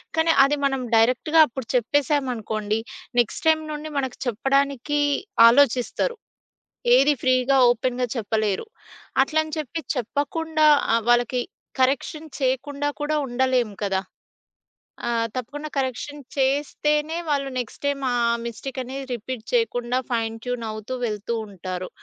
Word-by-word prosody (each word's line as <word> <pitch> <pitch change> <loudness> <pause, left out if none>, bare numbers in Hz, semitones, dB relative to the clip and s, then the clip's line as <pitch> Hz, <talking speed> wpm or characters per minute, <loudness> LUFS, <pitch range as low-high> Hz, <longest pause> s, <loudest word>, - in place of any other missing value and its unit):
కానీ 320 +1 +3
అది 285 +2 +3
మనం 270 -2 0
డైరెక్ట్‌గా 250 +8 +3
అప్పుడు 245 -1 -7
చెప్పేశామనుకోండి, 240 -5 0 0.4
నెక్స్ట్ 235 +4 0
టైమ్ 315 0 +4
నుండి 300 +1 -5
మనకు 265 -3 -2
చెప్పడానికి 275 +4 0 0.5
ఆలోచిస్తారు. 265 - +3 0.8
ఏది 280 +2 +4
ఫ్రీ‌గా, 255 +1 +3
ఓపెన్‌గా 250 +1 -1
చెప్పలేరు. 215 - -1 0.6
అట్లని 315 0 -1
చెప్పి 310 +3 -4
చెప్పకుండా 310 +5 0 0.3
ఆహ్, 230 -1 +2
వాళ్ళకి 240 +1 +3 0.4
కరెక్షన్ 275 +4 +1
చేయకుండా 280 +2 -1
కూడా 305 +1 0
ఉండలేము 250 -3 0
కదా! 195 -2 0 1.1
ఆహ్, 230 -1 +1
తప్పకుండా 290 +5 -5
కరెక్షన్ 270 +2 -2 0.2
చేస్తేనే 295 +3 +1
వాళ్ళు 280 -2 0
నెక్స్ట్ 245 -3 -4
టైమ్ 285 -1 0
ఆ 245 - 0 0.3
మిస్టేక్ 235 +4 -6
అనేది 265 +2 -6
రిపీట్ 240 0 -5
చేయకుండా 250 - +1
ఫైన్ 225 -2 -1
ట్యూన్ 245 -2 -3
అవుతూ 215 +4 -6
వెళ్తూ 215 +1 -2
ఉంటారు. 185 -2 -6
260 Hz, 115 wpm, -23 LUFS, 235-290 Hz, 1.1 s, టైమ్